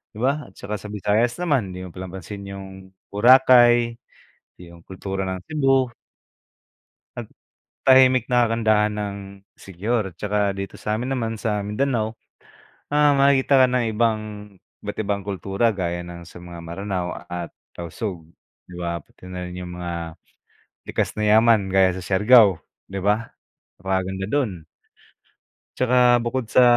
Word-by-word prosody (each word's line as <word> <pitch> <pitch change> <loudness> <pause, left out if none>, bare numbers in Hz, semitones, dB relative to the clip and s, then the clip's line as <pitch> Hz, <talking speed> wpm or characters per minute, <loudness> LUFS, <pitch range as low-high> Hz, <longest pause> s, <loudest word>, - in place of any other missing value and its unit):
di 110 - -5
ba, 140 0 0
at 95 - -20
saka 105 -1 -5
sa 105 - -9
Visayas 105 +4 0
naman 120 - 0
di 90 - -7
mo 90 - -9
pinapansin 95 +2 -8
yung 100 0 -8 0.4
Boracay 120 +1 +6 0.7
yung 85 -1 -14
kultura 95 +1 -5
ng 95 -1 -3
Cebu. 135 -5 +1 1.2
At - - -6 0.6
tahimik 130 -2 +5
na 120 -1 +4
kagandahan 110 -2 +2
ng 105 -1 -4 0.4
Siquijor 100 +1 -3
at - - -38
saka 105 -1 0
dito 100 -1 -6
samin 110 +5 -2
naman 115 -3 -2
sa 105 -3 -1
Mindanao, 110 0 -1 0.8
ah, 145 -1 +4
makakita 135 -1 +4
ka - - +7
ng 125 -2 +1
ibang 110 -1 +2 0.6
iba't 105 - -5
ibang 100 -2 -2
kultura 100 +3 0
gaya 85 -3 -3
ng 85 -1 -10
sa 90 - -12
mga 85 -1 -9
Maranao 90 +1 -4 0.2
at 85 -1 -5 0.2
Tausug 85 0 -6 0.4
di 90 - -12
ba 85 -1 -3
pati 90 - -19
na 90 0 -6
rin 90 0 -7
yung 90 -1 -7
mga 85 -2 -5 0.7
likas - - -2
na 105 - -2
yaman, 110 -2 +5
gaya 95 -1 +4
sa 95 - -7
Siargao 105 0 +5 0.2
di 95 0 -6
ba 105 +4 0 0.5
napakaganda 95 +1 -2
dun. 125 -3 0 1.2
Tsaka 125 -1 +4
bukod 120 -1 -2
sa 125 - +5
105 Hz, 145 wpm, -23 LUFS, 95-120 Hz, 1.2 s, ka